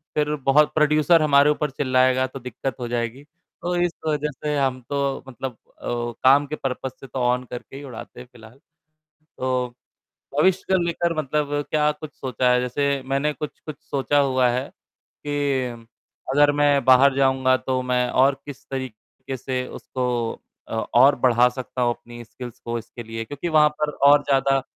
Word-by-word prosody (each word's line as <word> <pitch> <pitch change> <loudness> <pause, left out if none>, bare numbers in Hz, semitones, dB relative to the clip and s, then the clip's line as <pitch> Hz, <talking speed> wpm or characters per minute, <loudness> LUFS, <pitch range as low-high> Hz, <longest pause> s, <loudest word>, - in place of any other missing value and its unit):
फिर 150 0 +1
प्रोड्यूसर 150 +3 +4
हमारे 145 -1 +5
ऊपर 150 0 0
चिल्लाएगा, 130 -1 +2
तो 135 - -9
दिक्कत 125 +1 -5
हो 120 - -4
जाएगी। 120 +3 -3 0.4
तो 175 0 -1
इस 175 0 +1 0.2
वजह 150 -1 0
से 150 -1 0
हम 130 -2 0
तो 140 -1 -1
मतलब 125 -1 -6 0.2
अ, - - -9 0.4
काम 140 +2 +6
के 155 - -4
पर्पज़ 130 -1 -4
से 135 - -11
तो 130 +1 -5
ऑन 125 0 +1
करके 125 +2 -9
ही 140 - -8
उड़ाते 125 -5 -10
हैं 125 - -10
फिलहाल। 120 +2 -16 0.8
तो 130 -1 0 0.7
भविष्य 185 +4 +3
को 190 - +5
लेकर 170 0 -1
मतलब 150 0 -1 0.2
क्या 150 -1 +3
कुछ 150 0 -10
सोचा 125 -1 0
है? 125 - +4
जैसे 140 +2 0
मैंने 140 +3 0
कुछ-कुछ 150 +2 -7
सोचा 145 +1 0
हुआ 130 -2 +3
है, 125 +3 -2
कि 135 -5 -4 0.5
अगर 145 +1 +5
मैं 145 -1 +3
बाहर 130 +1 +6
जाऊँगा 130 -1 +3
तो 130 0 -2
मैं 125 -1 0
और 135 +1 +3
किस 140 -1 -10
तरीके 130 0 -7
से 125 +1 -3
उसको 130 -1 -4 0.6
अ, - - -7 0.2
और 135 +4 +7
बढ़ा 125 0 +5
सकता 125 0 -6
हूँ, 120 -1 +2
अपनी 120 0 -12
स्किल्स 120 +1 -10
को, 120 0 -4
इसके 115 +1 -10
लिए 115 0 -6
क्योंकि 145 +7 -5
वहाँ 150 -1 +5
पर 150 - +2 0.2
और 145 0 +6
ज़्यादा 135 -1 +2
135 Hz, 170 wpm, -23 LUFS, 125-145 Hz, 0.8 s, और